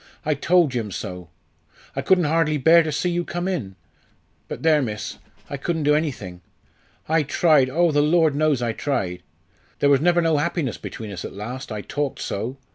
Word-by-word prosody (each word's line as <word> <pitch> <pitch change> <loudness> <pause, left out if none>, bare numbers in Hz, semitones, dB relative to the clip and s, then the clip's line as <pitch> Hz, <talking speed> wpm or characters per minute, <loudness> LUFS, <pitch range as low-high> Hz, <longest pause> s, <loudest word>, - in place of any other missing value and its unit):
I 155 - +2
told 170 +1 +3
Jim 115 -4 -3
so. 90 -3 -6 0.7
I - - -1
couldn't 185 -2 +3
hardly 155 0 +1
bear 165 +5 +6
to 155 -1 -2
see 180 +4 -1
you 175 0 -1
come 175 +1 -4
in. 120 - -3 0.7
But - - -7
there, 155 -2 +4
miss, 110 -4 -5 0.3
I 140 - -5
couldn't 160 +3 -2
do 150 +1 +4
anything. 120 - -2 0.7
I 160 +1 +3
tried, 145 -2 +3
oh! 170 +4 +2
the 145 0 +3
Lord 160 0 +3
knows 145 -3 +1
I 115 - 0
tried! 100 -11 -2 0.6
There 145 - +3
was 140 -1 +4
never 175 +1 +3
no 165 -2 +2
happiness 150 - -1
between 110 -2 -7
us 90 -3 -6
at - - -7
last, 120 +6 -7
I 105 -1 -4
talked 145 +5 -3
so. 115 +7 -4
145 Hz, 190 wpm, -23 LUFS, 120-165 Hz, 0.7 s, bear